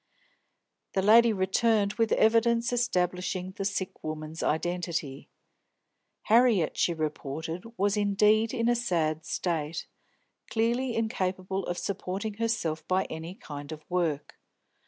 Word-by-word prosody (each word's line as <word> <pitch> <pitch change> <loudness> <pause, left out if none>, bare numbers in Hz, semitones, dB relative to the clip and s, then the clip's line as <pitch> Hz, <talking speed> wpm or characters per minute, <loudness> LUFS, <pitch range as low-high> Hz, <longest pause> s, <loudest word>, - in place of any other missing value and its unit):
That 190 - +1
lady 230 +2 +7
returned 205 +1 +2
with 225 0 0
evidence 230 +2 +3
establishing 185 -5 -1
the 195 - -5
sick 195 -1 -3
woman's 155 +1 -5
identity. 165 -4 -2 0.9
Harriet, 225 -7 +4
she - - +2
reported, 155 +2 -4
was 200 +2 +2
indeed 210 +2 +3
in 230 -3 0
a 240 - +4
sad 160 -9 -1
state, 160 -1 -2 0.6
clearly 235 +2 0
incapable 190 -3 -1
of 175 - -2
supporting 200 +2 -3
herself 225 -9 -1
by 185 +1 +2
any 160 +3 -6
kind 145 - -8
of 155 -1 -8
work. 165 -5 -1
190 Hz, 115 wpm, -28 LUFS, 160-225 Hz, 0.9 s, lady